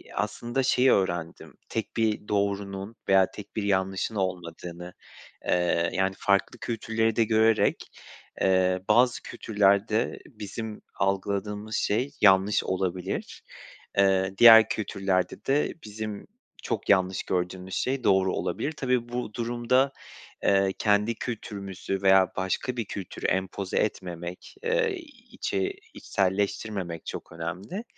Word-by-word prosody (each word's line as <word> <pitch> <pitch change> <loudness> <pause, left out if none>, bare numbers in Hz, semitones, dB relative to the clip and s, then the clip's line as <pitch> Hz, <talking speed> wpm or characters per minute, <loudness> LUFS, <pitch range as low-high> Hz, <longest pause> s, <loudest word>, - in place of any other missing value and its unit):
aslında 120 +5 -1
şeyi 130 0 +4
öğrendim. 85 -4 -1 0.2
Tek 115 +1 -4
bir 110 -2 0
doğrunun 100 +1 -2
veya 95 -1 +5
tek 105 -1 -11
bir 110 - -1
yanlışın 95 +2 0
olmadığını. 90 -1 -4 0.5
Eee, 85 -1 +1
yani 95 0 0
farklı 100 -1 +1
kültürleri 115 -1 -1
de 115 - +4
görerek, 110 0 +2 0.5
eee, 95 -1 +3
bazı 125 0 +4
kültürlerde 105 +2 +1
bizim 110 0 -7
algıladığımız 100 +2 -2
şey 125 +7 0
yanlış 100 0 +5
olabilir. 95 0 -3 0.6
Eee, 95 -1 +3
diğer 115 -2 +9
kültürlerde 95 -2 -1
de 140 +2 +1
bizim 105 -1 -6 0.4
çok 105 - -3
yanlış 95 -2 +3
gördüğümüz 90 +1 -3
şey 130 0 -1
doğru 95 -1 +3
olabilir. 155 - -2
Tabii 125 -5 -1
bu 120 -3 -4
durumda, 120 +3 +1 0.5
eee, 95 -1 +3
kendi 105 +2 +2
kültürümüzü 100 -5 -5
veya 95 -1 +5
başka 95 +6 -2
bir 115 - -1
kültürü 95 -3 -7
empoze 95 0 -1
etmemek, 90 -3 -3
eee, 470 -3 +1 0.4
içe 390 +9 -2 0.2
içselleştirmemek 100 -2 -2
çok - - -7
önemli. 90 - -5
100 Hz, 115 wpm, -27 LUFS, 95-115 Hz, 0.6 s, diğer